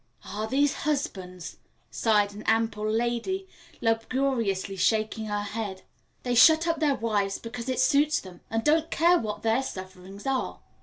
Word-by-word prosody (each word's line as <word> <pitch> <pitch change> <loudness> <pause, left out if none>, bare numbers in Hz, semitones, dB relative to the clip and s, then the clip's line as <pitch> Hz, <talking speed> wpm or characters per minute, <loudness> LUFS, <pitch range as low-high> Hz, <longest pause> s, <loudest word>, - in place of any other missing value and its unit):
"Ah, 215 +1 -4
these 275 +4 +2
husbands!" 190 - -3 0.3
sighed 210 -2 +2
an 210 - -9
ample 225 -1 +1
lady, 240 - -1 0.3
lugubriously 225 -4 0
shaking 220 +2 +1
her 205 0 -2
head; 205 -2 -5 0.4
"they 245 - -1
shut 315 +7 +6
up 330 - 0
their 295 -3 +2
wives 205 -4 0
because 235 +1 -7
it 255 - -1
suits 290 +3 +3
them, 180 -2 -12
and 225 +1 -1
don't 320 +2 +2
care 345 +2 +4
what 215 -2 -5
their 225 +3 +2
sufferings 190 -2 -8
are." 270 -1 -1
225 Hz, 150 wpm, -27 LUFS, 205-275 Hz, 0.4 s, shut